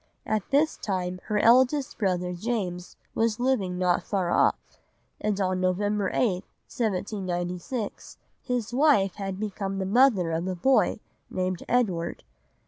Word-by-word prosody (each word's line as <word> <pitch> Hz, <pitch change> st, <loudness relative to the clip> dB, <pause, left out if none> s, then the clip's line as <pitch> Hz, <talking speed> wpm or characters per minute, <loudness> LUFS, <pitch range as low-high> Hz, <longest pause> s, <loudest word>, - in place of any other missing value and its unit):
At 215 Hz, -3 st, -1 dB
this 295 Hz, +3 st, +2 dB
time 185 Hz, -2 st, -3 dB
her 210 Hz, -, -1 dB
eldest 260 Hz, +6 st, +4 dB
brother 180 Hz, -3 st, 0 dB
James 180 Hz, -3 st, -3 dB, 0.2 s
was 225 Hz, -1 st, 0 dB
living 230 Hz, -8 st, 0 dB
not 180 Hz, -1 st, +2 dB
far 185 Hz, -4 st, -1 dB
off, -, -, +3 dB, 0.6 s
and 210 Hz, -1 st, -1 dB
on 185 Hz, -1 st, 0 dB
November 200 Hz, +2 st, +1 dB
8, 185 Hz, -7 st, +1 dB, 0.2 s
1796, 190 Hz, 0 st, -3 dB, 0.2 s
his 245 Hz, -3 st, -3 dB
wife 255 Hz, -, +4 dB
had 195 Hz, -1 st, -4 dB
become 195 Hz, -2 st, -3 dB
the 190 Hz, -, -1 dB
mother 205 Hz, -5 st, +4 dB
of 165 Hz, +3 st, -2 dB
a 185 Hz, -, -2 dB
boy, 265 Hz, +10 st, +2 dB, 0.3 s
named 185 Hz, -1 st, -2 dB
Edward. 190 Hz, -9 st, 0 dB
195 Hz, 135 wpm, -26 LUFS, 180-230 Hz, 0.6 s, eldest